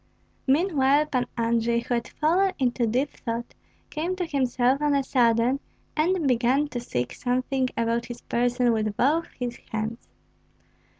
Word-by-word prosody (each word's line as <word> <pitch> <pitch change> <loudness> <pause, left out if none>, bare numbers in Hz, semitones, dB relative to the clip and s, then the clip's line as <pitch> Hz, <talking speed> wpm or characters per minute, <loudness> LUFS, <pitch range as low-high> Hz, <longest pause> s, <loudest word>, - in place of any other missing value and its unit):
Meanwhile 290 -1 +3
Pan 255 -5 -1
Andrei, 235 0 +1
who 245 - -3
had 235 -1 -1
fallen 370 +5 +1
into 245 -2 +1
deep 255 +6 0
thought, 235 -1 -5 0.4
came 335 +4 -2
to 365 -1 -2
himself 260 -2 +1
on 295 -1 +2
a 275 - +2
sudden, 245 0 +2 0.4
and 330 0 +1
began 255 +4 +2
to 245 - -4
seek 125 - -3
something 255 +1 -1
about 230 +1 0
his 240 0 -8
person 245 0 +1
with 215 -2 -1
both 315 +6 +2
his 245 -1 -3
hands. 220 +2 -4
250 Hz, 145 wpm, -25 LUFS, 235-285 Hz, 0.4 s, Meanwhile